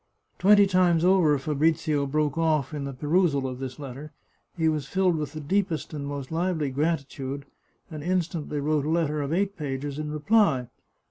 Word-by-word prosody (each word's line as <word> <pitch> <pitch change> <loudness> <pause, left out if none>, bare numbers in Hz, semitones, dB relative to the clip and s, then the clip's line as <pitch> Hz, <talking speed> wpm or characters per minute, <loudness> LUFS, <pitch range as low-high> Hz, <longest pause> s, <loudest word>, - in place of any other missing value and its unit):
Twenty 205 +1 +6
times 180 -3 +3
over 180 -6 +4
Fabrizio 150 0 0
broke 150 0 0
off 155 -3 +1
in 145 -2 -4
the 140 - -4
perusal 145 0 +1
of 130 -1 -6
this 130 -1 -6
letter. 140 +1 -8 0.5
He 160 -1 +2
was 150 -3 0
filled 185 0 +2
with 150 -2 -4
the 155 - -5
deepest 170 +1 -1
and 140 -2 -4
most 140 -1 -5
lively 165 -4 -1
gratitude, 140 -2 -2 0.5
and 155 -2 -6
instantly 165 -3 -2
wrote 150 0 0
a - - -1
letter 155 -2 0
of 140 0 -3
eight 195 +3 0
pages 145 -1 -4
in 155 0 -3
reply. 150 - +2
150 Hz, 175 wpm, -26 LUFS, 140-170 Hz, 0.5 s, Twenty